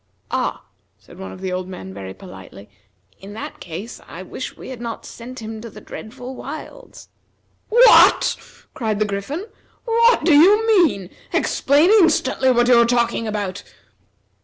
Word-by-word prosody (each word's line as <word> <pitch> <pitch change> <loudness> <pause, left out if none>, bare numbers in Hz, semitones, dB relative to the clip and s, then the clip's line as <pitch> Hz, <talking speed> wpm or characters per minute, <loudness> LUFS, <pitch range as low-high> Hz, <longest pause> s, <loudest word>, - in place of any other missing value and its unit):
"Ah!" - - -2 0.3
said - - -17
one 95 0 -7
of 95 - -11
the 190 - -3
old 185 0 -4
men 95 - -9
very 95 -1 -8
politely, 100 - -13 0.5
"in 195 +1 -11
that 220 - -8
case 180 +7 -8
I 180 - -9
wish 255 - -7
we - - -10
had 255 -3 -8
not 235 -1 -6
sent 245 0 -10
him 220 0 -7
to 230 - -8
the 210 - -12
dreadful 250 +4 -9
wilds!" - - -10 0.6
"What!" 475 +3 +6 0.4
cried 220 -4 -2
the 215 - +1
Griffin. 210 - -4 0.4
"What 465 -5 +3
do 335 - +5
you 400 +9 +6
mean? 340 - +2 0.2
Explain 295 +7 +2
instantly 320 -10 +3
what 240 -1 +3
you 245 -1 +6
are - - +4
talking 235 -1 0
about!" 205 -3 -4
235 Hz, 160 wpm, -20 LUFS, 195-290 Hz, 0.6 s, What